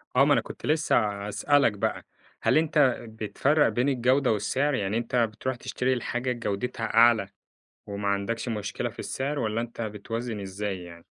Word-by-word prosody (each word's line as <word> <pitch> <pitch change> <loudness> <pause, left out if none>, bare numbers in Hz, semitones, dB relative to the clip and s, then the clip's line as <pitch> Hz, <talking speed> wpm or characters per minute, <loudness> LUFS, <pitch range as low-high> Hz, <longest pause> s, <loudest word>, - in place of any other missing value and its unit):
آه 135 +2 +6
ما 145 - +5
أنا - - +3
كنت - - -9
لسه 155 +1 +2 0.3
هاسألك 140 +3 +3
بقى: 100 - -2 0.4
هل - - +3
أنت 150 -5 +3
بتفرّق 130 +7 +1
بين 125 +3 +1
الجودة 130 0 +2
والسعر، 130 +8 0
يعني 105 -2 0
أنت 120 +2 -3
بتروح 120 +2 0
تشتري 125 +1 -1
الحاجة 125 +1 -2
جودتها 115 0 -3
أعلى 115 -4 +5 0.6
وما 100 0 -3
عندكش 100 +5 -1
مشكلة 105 +2 -3
في - - -20
السعر، 140 +2 -3
والّا 110 -2 -1
أنت 120 0 -6
بتوازِن 110 +1 -4
إزاي 95 -1 -4
يعني؟ 85 -1 -12
115 Hz, 160 wpm, -27 LUFS, 105-130 Hz, 0.6 s, آه